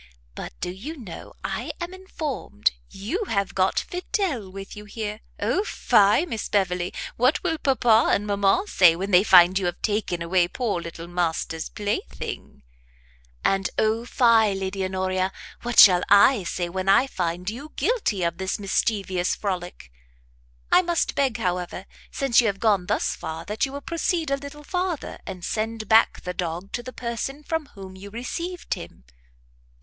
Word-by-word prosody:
But - - -8
do - - -2
you 260 - -7
know 210 -10 -10
I - - -3
am 350 +1 -5
informed 315 - -2 0.2
you 245 - -3
have 200 - -1
got 190 0 +1
Fidel 355 - -2
with 195 +1 -8
you 210 0 -9
here? 210 0 -5 0.2
O 235 - +1
fie, 210 - +3
Miss 225 -11 -4
Beverley! 180 -3 0 0.3
What 255 +5 +2
will 325 -3 -1
papa 240 -4 +4
and 205 - +1
mamma 200 - +2
say, 180 - +5
when 195 +4 -4
they 180 +1 +6
find 185 -1 +7
you 185 - -1
have 175 - -3
taken 205 -5 -1
away 175 +1 +2
poor 210 -3 -2
little 170 0 -8
master's 165 -2 -2
plaything?" 200 - -5 0.8
"And 195 -1 +2
O 220 +1 +1
fie, 230 -4 +4
Lady 190 0 -3
Honoria! 185 0 -1 0.3
what 240 -1 -4
shall 180 -3 +9
I 205 +1 +6
say, 175 +1 -2
when 185 +2 -2
I 200 +6 +6
find 180 -6 -3
you 265 +9 -5
guilty 315 - 0
of 170 +1 -1
this 190 0 -1
mischievous 195 -2 0
frolic! 180 - -5 0.8
I - - +7
must 345 -2 0
beg, 270 -5 +1
however, 180 -2 -3 0.2
since 265 -3 +3
you 235 - +1
have 195 -2 -1
gone 200 -5 +2
thus - - 0
far, 160 +1 -6
that 210 +7 -1
you - - -9
will 285 - -5
proceed 335 -1 -1
a 275 - +2
little 285 +2 -10
farther, 360 -1 -3
and 185 -3 -6
send 220 0 -3
back 220 +2 +4
the 180 - -4
dog 175 +2 -4
to 240 - -3
the 255 +1 -8
person 250 +4 -4
from 320 -1 -2
whom 190 -1 -10
you 195 +2 -10
received 335 - -4
him." - - -9
205 Hz, 165 wpm, -24 LUFS, 185-260 Hz, 0.8 s, shall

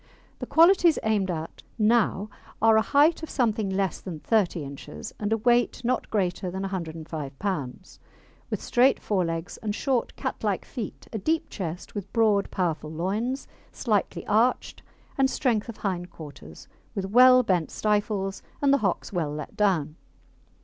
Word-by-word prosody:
The - - -5
qualities 340 0 +5
aimed 210 -3 +1
at 160 -2 -5 0.2
now 215 -2 +2 0.3
are 225 0 +5
a 220 - +5
height 295 +8 +3
of 320 - -6
something 220 -5 0
less 190 -2 -1
than 170 -5 -6
30 185 -5 +1
inches, 140 +1 -8
and 210 0 -2
a 225 - +3
weight 240 +2 +2
not 255 +1 0
greater 185 -3 -1
than 190 +2 -4
105 160 -6 -5
lbs., 185 -3 -4 0.5
with - - -2
straight 255 +3 +3
fore 195 -4 0
legs 165 0 -4
and 210 -2 -3
short, 260 -1 -1
cat - - -4
like - - -1
feet, - - -7
a 220 - -2
deep 320 - -1
chest, 175 -3 -5
with 205 -3 -6
broad, 215 -4 +3
powerful 160 -5 -2
loins, 205 - -2 0.2
slightly 215 -5 -1
arched, 225 +4 +1 0.4
and 265 0 +4
strength 235 -5 0
of 230 - -7
hind 180 -3 -3
quarters, 140 - -11 0.3
with 195 - -2
well 255 +5 +7
bent 180 -7 +1
stifles, 205 -2 -1 0.2
and 280 -1 +3
the 280 - +4
hocks 195 -1 -1
well 165 -5 -1
let 150 -1 -7
down. 170 -7 +1
205 Hz, 160 wpm, -26 LUFS, 175-230 Hz, 0.5 s, well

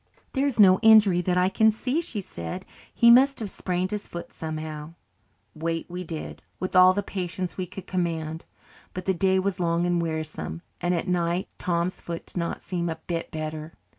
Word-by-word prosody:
"There 275 +1 +2
is 265 -5 -1
no 185 -2 +7
injury 215 -5 +6
that 180 0 0
I 180 0 +4
can 220 +3 +4
see," 255 +8 -1
she 220 -10 -3
said. 85 - -7 0.3
"He 235 0 +6
must 270 +3 +6
have 210 -4 -4
sprained 180 0 -2
his 210 -1 -4
foot 170 - -7
somehow." 155 0 -6 0.6
Wait 165 +1 -3
we 180 +1 -4
did, 160 -2 -6 0.2
with 185 0 -3
all 185 0 +8
the 205 +1 -1
patience 185 -1 -4
we 185 -1 -3
could 185 +1 -9
command. 165 -3 -2 0.5
But 185 0 -5
the 190 - +2
day 190 +1 +2
was 190 0 -1
long 170 0 +1
and 175 -1 +1
wearisome, 155 - -4 0.2
and 175 +1 +1
at 170 - -2
night 175 0 0
Tom's 175 +1 -1
foot 170 -1 -6
did - - -10
not 170 -1 -2
seem 175 -2 -2
a 160 - -2
bit 165 +1 -4
better. 155 0 -5
180 Hz, 195 wpm, -26 LUFS, 165-190 Hz, 0.6 s, all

